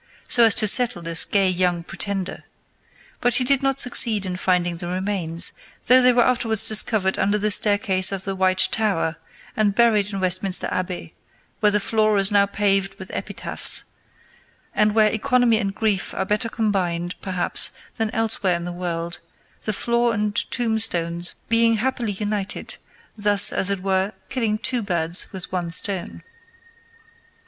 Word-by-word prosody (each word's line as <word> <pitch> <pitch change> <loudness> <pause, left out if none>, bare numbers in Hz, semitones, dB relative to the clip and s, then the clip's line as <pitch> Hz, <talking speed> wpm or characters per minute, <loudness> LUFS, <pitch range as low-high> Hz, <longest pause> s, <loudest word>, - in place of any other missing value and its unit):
so 240 - +4
as 220 - +6
to 215 - +3
settle 225 -5 +4
this 165 -1 +1
gay 200 -2 +1
young 180 -2 -1
pretender; 195 +1 -6 0.8
but 245 0 0
he 255 - +1
did 275 +1 0
not 270 0 -1
succeed 230 -5 +4
in 185 -1 -5
finding 180 -2 -1
the 175 0 -6
remains, 180 -2 0 0.3
though 255 +1 +6
they 250 0 +5
were 240 -1 +2
afterwards 225 -3 +2
discovered 215 -3 +3
under 205 +2 0
the 210 0 0
staircase 200 -2 +3
of 195 -1 -4
the 195 0 -4
White 185 0 +2
Tower, 190 -8 -1 0.4
and 205 -2 0
buried 215 -3 +2
in 195 - -5
Westminster 185 0 0
Abbey, 85 - -5 0.5
where 210 - +2
the 210 - +2
floor 215 0 0
is 195 0 +5
now 200 -1 +3
paved 195 -1 -1
with 190 - -11
epitaphs, - - -3 0.9
and 210 0 +1
where 215 -1 +3
economy 245 -1 +1
and 200 -2 -4
grief 210 -3 -2
are 190 - -2
better 210 +3 -2
combined, 180 -6 -2
perhaps, 185 -2 +1 0.3
than 225 -1 -1
elsewhere 220 -5 0
in 170 0 -5
the 175 - -6
world, 170 -1 -5 0.5
the 215 - -1
floor 235 +2 -1
and 210 0 -2
tombstone 215 -8 -2 0.3
being 230 0 +3
happily 235 -2 -3
united, 205 0 -4 0.4
thus, 205 -1 +6
as 195 - +1
it 195 -2 -3
were, 190 +1 -1 0.2
killing 225 -5 -2
two 250 +1 -2
birds 175 -4 0
with 190 -2 -9
one 180 -2 -4
stone. 190 +2 +1
200 Hz, 160 wpm, -21 LUFS, 185-220 Hz, 0.9 s, as